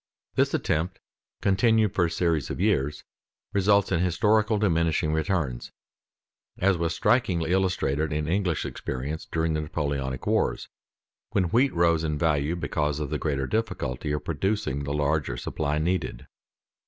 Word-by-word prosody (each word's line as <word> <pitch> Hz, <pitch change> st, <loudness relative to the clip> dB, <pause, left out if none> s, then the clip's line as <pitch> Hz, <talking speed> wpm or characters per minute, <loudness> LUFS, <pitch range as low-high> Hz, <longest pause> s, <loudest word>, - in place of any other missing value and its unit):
This -, -, +2 dB
attempt 85 Hz, +4 st, -1 dB, 0.4 s
continued 110 Hz, +1 st, +3 dB
for 90 Hz, -, +2 dB
a -, -, -1 dB
series 80 Hz, -5 st, 0 dB
of -, -, -4 dB
years 70 Hz, +3 st, +1 dB, 0.5 s
results 100 Hz, 0 st, +3 dB
in 85 Hz, -, +2 dB
historical 105 Hz, +5 st, +2 dB
diminishing 85 Hz, -6 st, +1 dB
returns, 80 Hz, -7 st, -1 dB, 0.9 s
as 100 Hz, +1 st, +3 dB
was 85 Hz, -1 st, -1 dB
strikingly 90 Hz, -10 st, +2 dB
illustrated 90 Hz, -6 st, +1 dB
in 75 Hz, 0 st, -1 dB
English 90 Hz, -2 st, 0 dB
experience 70 Hz, +5 st, -4 dB
during 80 Hz, 0 st, 0 dB
the 75 Hz, -, 0 dB
Napoleonic 70 Hz, -4 st, -3 dB
wars, -, -, 0 dB, 0.6 s
when 95 Hz, -4 st, +2 dB
wheat 130 Hz, +6 st, +3 dB
rose 85 Hz, -1 st, +3 dB
in 75 Hz, -2 st, -1 dB
value 75 Hz, 0 st, +1 dB
because 75 Hz, -3 st, -1 dB
of 75 Hz, -1 st, -4 dB
the 75 Hz, -, -1 dB
greater 70 Hz, -4 st, -1 dB
difficulty 70 Hz, -, -2 dB
of 75 Hz, -, -3 dB
producing 80 Hz, -4 st, -1 dB
the 70 Hz, -, -3 dB
larger 75 Hz, -4 st, 0 dB
supply 75 Hz, +4 st, -2 dB
needed. 80 Hz, -6 st, -1 dB
80 Hz, 140 wpm, -26 LUFS, 75-95 Hz, 0.9 s, continued